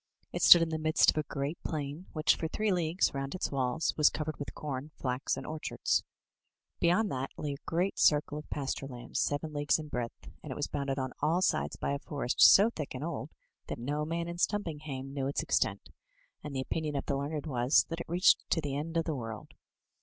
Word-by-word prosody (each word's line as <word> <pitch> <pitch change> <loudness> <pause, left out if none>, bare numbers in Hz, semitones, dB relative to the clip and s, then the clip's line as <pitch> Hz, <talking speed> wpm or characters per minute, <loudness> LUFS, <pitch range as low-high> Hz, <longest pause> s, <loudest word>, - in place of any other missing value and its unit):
It - - -2
stood 170 -1 +9
in 165 - -2
the 160 -1 -2
midst 155 0 +4
of - - -10
a 150 -2 -2
great 140 +3 -3
plain, 150 +3 -4
which 155 -1 +3
for 160 - -3
three 210 +5 0
leagues 175 0 +1
round 135 +3 -3
its 185 - -2
walls 130 +2 0
was 150 -1 +6
covered 155 0 -4
with 145 - -6
com, 145 -1 -5
flax 130 +1 -1
and - - -6
orchards. 155 0 -1 0.8
Beyond 185 +5 +3
that 130 +1 -2
lay 145 -2 -3
a 140 - -11
great 180 +4 0
circle 150 0 +3
of 150 - -12
pasture 135 -1 -3
land, 120 -2 -7
seven 150 +2 -1
leagues 145 0 +2
in 155 -1 -7
breadth, 120 -3 -5
and - - -8
it - - -4
was - - -1
boimded 140 -1 -2
on 130 -1 -2
all 165 +5 +2
sides - - +1
by - - -2
a 140 - -1
forest 140 -4 -2
so 210 +4 +8
thick 150 - -5
and 130 - -5
old 165 -1 -4 0.4
that - - -4
no 145 +6 -2
man 165 +2 -2
in 170 0 -5
Stumpinghame 150 -10 -2
knew 135 -1 -1
its 140 - -1
extent; - - 0 0.5
and 150 -2 -6
the 130 - 0
opinion 150 +2 -3
of 140 - -2
the 140 - 0
learned 145 +2 -3
was, 125 -2 +3
that 165 0 -4
it 170 - -7
reached 175 +3 +4
to - - +2
the 145 -3 -3
end 165 +3 -3
of 165 - +1
the 160 - -1
world. 115 -5 -6
150 Hz, 220 wpm, -31 LUFS, 140-165 Hz, 0.8 s, stood